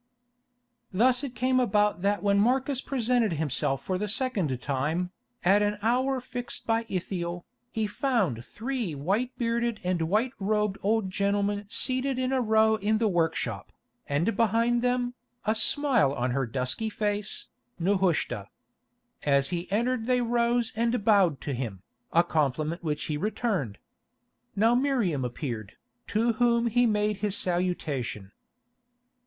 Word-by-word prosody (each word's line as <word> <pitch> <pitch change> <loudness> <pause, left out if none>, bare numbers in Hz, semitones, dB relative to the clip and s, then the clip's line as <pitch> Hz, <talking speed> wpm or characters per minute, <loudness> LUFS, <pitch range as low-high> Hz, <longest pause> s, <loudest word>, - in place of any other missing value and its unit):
Thus 245 +7 +3
it 260 -3 -5
came 255 0 +2
about 210 -6 +2
that 205 +2 0
when 200 -1 +3
Marcus 260 +4 +1
presented 245 -5 +1
himself 135 -3 0
for 185 -1 -2
the 210 - -2
second 205 - 0
time, 150 +7 -1 0.3
at 200 +3 +5
an 210 0 +1
hour 255 +3 +2
fixed 245 -1 -6
by 225 0 0
Ithiel, 175 -2 -3 0.3
he 220 -2 -1
found 205 - 0
three 230 - -4
white 195 - 0
bearded 235 -1 0
and 180 -1 0
white 220 +6 +2
robed 210 0 0
old 210 -2 +1
gentlemen 200 +1 0
seated 260 +4 +2
in 255 +1 0
a 260 - +2
row 220 -1 +3
in 215 +1 +1
the 225 0 +2
workshop, 160 - -1 0.4
and 160 +11 0
behind 230 +2 +2
them, 245 0 0 0.3
a 215 - +3
smile 235 - +3
on 125 -1 -1
her 135 0 0
dusky 130 - -2
face, 210 -1 -2 0.3
Nehushta. 175 - 0 0.7
As 140 -1 +2
he 175 +1 -4
entered 235 +2 0
they 250 -1 +3
rose 235 0 +1
and 230 -1 0
bowed 195 -9 +4
to 140 - -3
him, 110 -7 -5 0.3
a 170 - +5
compliment 155 +1 -1
which 150 -2 -2
he 150 - -2
returned. 190 - -2 0.8
Now 225 +3 +4
Miriam 240 - +1
appeared, 120 -4 -5 0.3
to 230 +2 +1
whom 235 -1 +3
he 245 +1 +3
made 210 -1 +1
his 205 0 0
salutation. 150 - -2
210 Hz, 140 wpm, -27 LUFS, 170-235 Hz, 0.8 s, at